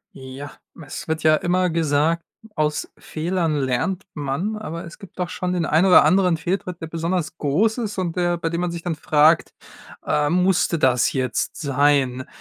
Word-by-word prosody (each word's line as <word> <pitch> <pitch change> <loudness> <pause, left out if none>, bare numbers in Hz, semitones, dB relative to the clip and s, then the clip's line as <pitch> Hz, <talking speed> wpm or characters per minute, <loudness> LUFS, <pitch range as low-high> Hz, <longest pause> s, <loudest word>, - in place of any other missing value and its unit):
Ja, 135 +2 -9 0.3
es 145 - -7
wird 160 -1 -2
ja 155 0 +5
immer 180 +1 +1
gesagt: 160 +1 +1 0.3
„aus 150 -2 -1
Fehlern 165 0 -2
lernt 145 +7 -1
man.“ 150 +9 -3
Aber 170 -6 -6
es 170 - -12
gibt 195 - -14
doch 180 -1 -1
schon 180 0 -3
den 175 -2 0
ein 165 +5 +3
oder 180 - +8
anderen 180 +1 +3
Fehltritt, 180 +1 -3
der - - -3
besonders 165 0 -2
groß 205 - +1
ist 215 -4 -4
und 175 -3 -2
der 175 -1 +1
bei 165 -1 -2
dem 170 +1 -2
man 180 - -1
sich 170 -1 -6
dann 175 - -1
fragt, 155 +1 +3 0.5
äh, 145 0 +1
„musste 180 0 +2
das 130 -4 +2
jetzt 130 -2 -1
sein?“ 140 -3 +1
165 Hz, 180 wpm, -22 LUFS, 145-180 Hz, 0.5 s, oder